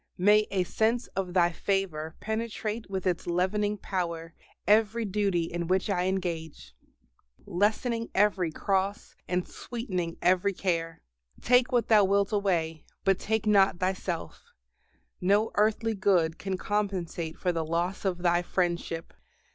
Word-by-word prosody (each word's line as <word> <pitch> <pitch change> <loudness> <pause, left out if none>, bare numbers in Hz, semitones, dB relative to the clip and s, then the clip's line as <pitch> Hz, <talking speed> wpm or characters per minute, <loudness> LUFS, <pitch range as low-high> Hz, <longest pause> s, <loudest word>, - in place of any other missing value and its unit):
may 210 +3 +4
a 190 -2 +1
sense 225 +6 0
of 185 -2 -3
Thy 175 -1 +4
favor 165 -4 -2
penetrate 220 -1 -3
with 190 -1 -3
its 180 -2 -1
leavening 205 +4 0
power 170 -4 -3 0.3
every 220 +2 +3
duty 195 -3 0
in 170 0 -4
which 190 +3 +1
I 180 -2 +1
engage, 175 -5 -3 0.7
lessening 230 +5 0
every 190 -4 +2
cross 195 +4 -1
and 180 0 -1
sweetening 185 -9 -4
every 185 +2 +2
care. 165 -3 -2 0.4
Take 245 +1 +3
what 240 -3 +2
Thou 215 -2 +6
wilt 200 +1 +2
away, 170 -6 0 0.2
but 195 -1 +2
take 220 0 -1
not 200 -3 +4
Thyself; 185 -2 -3 0.8
no 200 +4 +3
earthly 220 +2 +2
good 180 -5 +2
can 190 -1 -3
compensate 185 -5 -2
for 180 - 0
the 165 -2 -1
loss 170 +4 -2
of 180 -3 -2
Thy 175 0 +3
friendship. 170 -2 -2
190 Hz, 135 wpm, -28 LUFS, 175-210 Hz, 0.8 s, Thou